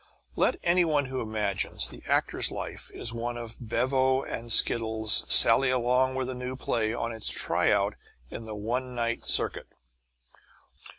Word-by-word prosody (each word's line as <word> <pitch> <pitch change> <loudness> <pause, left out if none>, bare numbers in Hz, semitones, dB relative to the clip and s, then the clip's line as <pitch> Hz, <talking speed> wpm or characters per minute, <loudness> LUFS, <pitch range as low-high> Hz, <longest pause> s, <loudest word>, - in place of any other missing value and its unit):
Let - - +1
any 175 +1 +2
one 150 -4 0
who 130 0 -5
imagines 105 -3 0
the - - -12
actor's - - +1
life - - -7
is 115 - -5
one 120 +1 -5
of 115 -1 -8
bevo 130 +3 -1
and 115 0 -6
skittles 110 -1 +4
sally 135 0 +7
along 130 +1 0
with 130 -1 -3
a 130 - -5
new 125 +1 -6
play 115 -4 -2
on 115 0 -4
its 110 -1 -2
try - - 0
out - - 0 0.4
in 115 - -8
the 110 -1 -8
one 125 +4 -5
night 115 -1 -3
circuit. - - +3
120 Hz, 160 wpm, -26 LUFS, 115-130 Hz, 0.4 s, sally